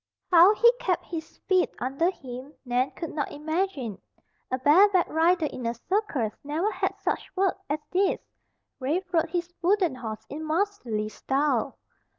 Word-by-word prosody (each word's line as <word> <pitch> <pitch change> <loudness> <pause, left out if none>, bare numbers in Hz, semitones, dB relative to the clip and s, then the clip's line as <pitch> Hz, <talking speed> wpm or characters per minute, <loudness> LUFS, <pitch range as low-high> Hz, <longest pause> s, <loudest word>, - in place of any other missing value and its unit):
How 360 +4 +8
he 470 +2 +6
kept 360 -7 0
his 325 -2 -7
feet 370 -2 +3
under 275 +7 0
him 265 -3 -8
Nan 250 +2 +1
could 330 - -6
not 295 -2 -2
imagine. 300 - -2 0.5
A 255 - 0
bareback 360 +8 +5
rider 330 +1 +3
in 255 -5 -4
a 235 - -1
circus 270 - -1
never 320 +9 -1
had - - -1
such - - -2
work 385 -1 +1
as 295 - +1
this. 380 +1 +2 0.6
Rafe 345 +8 -2
rode 330 -1 +2
his 350 0 -3
wooden 360 -3 +3
horse 225 -4 -6
in 310 +2 -6
masterly 310 - -1
style. 270 +2 0
320 Hz, 155 wpm, -27 LUFS, 260-370 Hz, 0.6 s, How